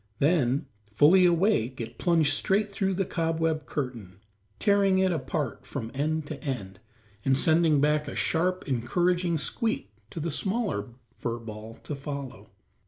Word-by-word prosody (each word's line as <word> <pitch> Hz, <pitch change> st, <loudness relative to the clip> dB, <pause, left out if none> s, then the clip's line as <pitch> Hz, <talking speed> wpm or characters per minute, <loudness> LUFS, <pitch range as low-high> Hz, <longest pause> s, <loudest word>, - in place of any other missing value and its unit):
Then, 145 Hz, -1 st, +2 dB, 0.3 s
fully 175 Hz, -, +6 dB
awake, 170 Hz, -, +1 dB
it 115 Hz, -, -7 dB
plunged 165 Hz, -4 st, +3 dB
straight 200 Hz, +8 st, +2 dB
through 195 Hz, -1 st, -1 dB
the 195 Hz, +1 st, 0 dB
cobweb 165 Hz, -2 st, -1 dB
curtain, 120 Hz, -10 st, -5 dB, 0.4 s
tearing 200 Hz, -2 st, +3 dB
it 190 Hz, 0 st, +3 dB
apart 145 Hz, -3 st, -3 dB
from 115 Hz, -5 st, -6 dB
end 155 Hz, +3 st, -1 dB
to 145 Hz, -1 st, -7 dB
end, 100 Hz, -9 st, -4 dB, 0.4 s
and 135 Hz, 0 st, +3 dB
sending 160 Hz, 0 st, +4 dB
back 150 Hz, +1 st, +2 dB
a -, -, -6 dB
sharp, 180 Hz, +3 st, 0 dB
encouraging 175 Hz, +7 st, +1 dB
squeak 150 Hz, -, -1 dB, 0.2 s
to -, -, -7 dB
the 165 Hz, +1 st, -2 dB
smaller 190 Hz, -, -1 dB, 0.3 s
fur 120 Hz, -1 st, -2 dB
ball 110 Hz, -1 st, -9 dB
to -, -, -5 dB
follow. 135 Hz, -7 st, -7 dB
150 Hz, 145 wpm, -27 LUFS, 130-175 Hz, 0.4 s, fully